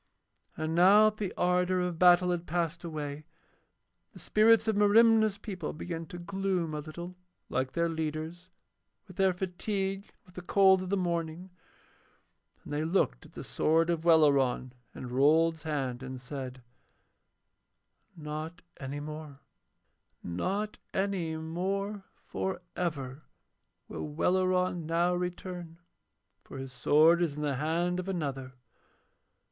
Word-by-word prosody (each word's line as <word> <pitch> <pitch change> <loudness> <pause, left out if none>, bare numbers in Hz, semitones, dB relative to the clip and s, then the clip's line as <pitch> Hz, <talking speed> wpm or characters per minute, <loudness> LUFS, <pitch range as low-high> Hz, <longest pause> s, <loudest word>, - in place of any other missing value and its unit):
And 155 +1 -2
now 200 +5 +6
that 215 - -23
the 200 -4 -3
ardour 180 +1 +2
of 180 -2 -2
battle 180 0 +6
had 175 -1 -3
passed 170 +1 -2
away, 150 -3 -5 0.9
the - - -14
spirits 220 +1 +4
of 220 - +2
Merimna's 215 0 +5
people 190 -6 -5
began 165 +1 -6
to 175 - -8
gloom 185 -2 -2
a 150 - -3
little, 170 +4 -8 0.3
like 130 0 -1
their 170 0 +1
leader's, 160 +2 -4 0.6
with 185 - -14
their 190 -1 +4
fatigue 195 +2 -3
and - - -26
with 180 - -20
the 180 - -7
cold 190 +1 +4
of 185 - -5
the 200 - +1
morning; 170 0 -3 1.1
and - - -8
they 150 +1 0
looked 160 - 0
at - - -23
the - - -7
sword 165 +2 +2
of 165 -1 -2
Welleran 140 -6 +3 0.2
in 125 - -7
Rold's 155 +5 +3
hand 135 -6 -3
and 130 -1 -6
said: 130 -1 -7 1.5
'Not 155 +3 -6
any 140 +1 -5
more, 150 -1 -8 0.8
not 195 - -3 0.2
any 190 -5 -1
more 195 +5 -3 0.2
for 185 -2 -3
ever 140 -6 -3 0.7
will 80 -1 -5
Welleran 180 - +1
now 170 +2 +2
return, 180 -1 -5 0.7
for - - -10
his 135 -1 -7
sword 155 +7 +4
is 160 -5 0
in 150 - -3
the 140 -3 -1
hand 170 +5 0
of 185 +1 -4
another. 135 -7 -4
170 Hz, 135 wpm, -30 LUFS, 150-185 Hz, 1.5 s, now